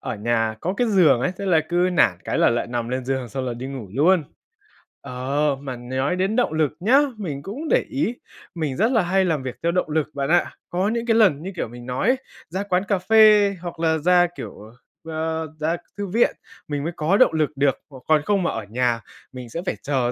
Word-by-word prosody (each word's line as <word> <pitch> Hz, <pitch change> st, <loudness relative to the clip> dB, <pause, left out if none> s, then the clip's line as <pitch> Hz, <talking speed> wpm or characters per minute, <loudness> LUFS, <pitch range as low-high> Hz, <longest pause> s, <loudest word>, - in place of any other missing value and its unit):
Ở -, -, -4 dB
nhà 115 Hz, +1 st, 0 dB
có 185 Hz, +3 st, -2 dB
cái 245 Hz, -, +1 dB
giường 180 Hz, -, +4 dB
ấy, 180 Hz, -, 0 dB
thế 200 Hz, -, -4 dB
là 165 Hz, -4 st, +4 dB
cứ 175 Hz, -, -2 dB, 0.2 s
nản 105 Hz, -, +3 dB
cái -, -, -1 dB
là -, -, +5 dB
lại 120 Hz, -, -1 dB
nằm 120 Hz, -1 st, -3 dB
lên 130 Hz, +1 st, -3 dB
giường, 130 Hz, -1 st, -2 dB
xong 130 Hz, +3 st, -4 dB
là 125 Hz, -2 st, -3 dB
đi 125 Hz, +2 st, -6 dB
ngủ 135 Hz, -6 st, -7 dB
luôn. 160 Hz, +4 st, +3 dB, 0.8 s
Ờ, 140 Hz, +3 st, -1 dB
mà 130 Hz, -3 st, -5 dB
nói 130 Hz, +6 st, -2 dB
đến 190 Hz, +4 st, 0 dB
động 245 Hz, -10 st, +1 dB
lực 155 Hz, -3 st, +1 dB
nhá, 240 Hz, +10 st, +5 dB, 0.2 s
mình 155 Hz, -10 st, -5 dB
cũng 240 Hz, -, -6 dB
để -, -, +3 dB
ý 275 Hz, -4 st, -1 dB, 0.4 s
mình 155 Hz, -5 st, -2 dB
rất 220 Hz, +7 st, +2 dB
là 230 Hz, -4 st, +3 dB
hay 190 Hz, +2 st, +2 dB
làm 155 Hz, -6 st, 0 dB
việc 130 Hz, -1 st, -5 dB
theo 170 Hz, -, +2 dB
động 180 Hz, -2 st, 0 dB
lực 155 Hz, -1 st, 0 dB
bạn 140 Hz, -1 st, -2 dB
ạ. 175 Hz, +1 st, +3 dB, 0.2 s
Có 185 Hz, +3 st, 0 dB
những 235 Hz, +1 st, -2 dB
cái 230 Hz, -2 st, +2 dB
lần 195 Hz, -11 st, +4 dB
như, 190 Hz, -, -5 dB
kiểu, 170 Hz, -, -3 dB
mình 120 Hz, +1 st, -11 dB
nói 125 Hz, -, -2 dB
ấy 260 Hz, -, +4 dB, 0.3 s
ra 190 Hz, +4 st, -3 dB
quán 185 Hz, -2 st, 0 dB
cà 200 Hz, -, +2 dB
phê 210 Hz, 0 st, +5 dB
hoặc 170 Hz, -2 st, -7 dB
là 160 Hz, -1 st, +2 dB
ra, 175 Hz, +2 st, +4 dB
kiểu, -, -, -7 dB
ờ, 110 Hz, +2 st, -14 dB, 0.4 s
a, 160 Hz, 0 st, -2 dB
ra 160 Hz, +3 st, 0 dB, 0.2 s
thư 200 Hz, -1 st, -3 dB
viện, 225 Hz, +6 st, +2 dB, 0.3 s
mình 145 Hz, -1 st, -3 dB
mới 170 Hz, -, -3 dB
có 160 Hz, +6 st, +2 dB
động 255 Hz, -, +5 dB
lực 155 Hz, -2 st, +1 dB
được, 140 Hz, -2 st, +2 dB
c -, -, -21 dB
còn 155 Hz, -2 st, +4 dB
không 200 Hz, -2 st, +1 dB
mà -, -, 0 dB
ở 115 Hz, -, -4 dB
nhà 120 Hz, 0 st, 0 dB, 0.3 s
mình 125 Hz, -2 st, -9 dB
sẽ 170 Hz, -, -4 dB
phải -, -, -1 dB
chờ 130 Hz, -4 st, 0 dB
160 Hz, 240 wpm, -22 LUFS, 130-190 Hz, 0.8 s, là